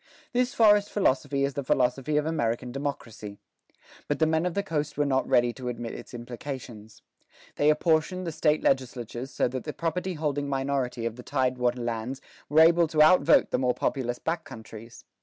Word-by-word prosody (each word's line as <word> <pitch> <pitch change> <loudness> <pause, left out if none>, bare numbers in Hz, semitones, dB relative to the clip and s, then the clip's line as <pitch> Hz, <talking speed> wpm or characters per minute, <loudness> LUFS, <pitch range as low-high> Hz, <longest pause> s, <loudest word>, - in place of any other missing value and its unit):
This 250 +1 +1
forest 210 -2 +5
philosophy 140 -7 +1
is 140 - -3
the 140 - -3
philosophy 130 +3 +1
of 150 - +1
American 125 -6 -1
democracy. 120 -7 -6 0.7
But 145 - -1
the 160 - +3
men 160 +2 +1
of 180 - -4
the 200 - 0
coast 150 -6 -3
were 145 - +2
not 135 -2 +1
ready 120 -1 +3
to 130 -1 -7
admit 120 -1 -5
its - - -10
implications. 120 -3 -8 0.5
They 145 - +3
apportioned 160 +3 +1
the 165 - -3
State 155 -1 +1
legislatures 125 -1 -1
so - - 0
that 130 0 -5
the 150 - -5
property 180 +2 -2
holding 145 -2 -2
minority 135 -3 -2
of 115 0 -3
the - - -8
tide 130 -1 -1
water 125 0 0
lands 120 +3 -3 0.3
were 155 +2 +5
able 170 +1 +5
to 155 0 +4
outvote 180 +4 +5
the - - +1
more 125 -1 +1
populous 120 -2 -2
back 165 +4 -3
countries. 110 +1 -11
140 Hz, 185 wpm, -27 LUFS, 125-155 Hz, 0.7 s, forest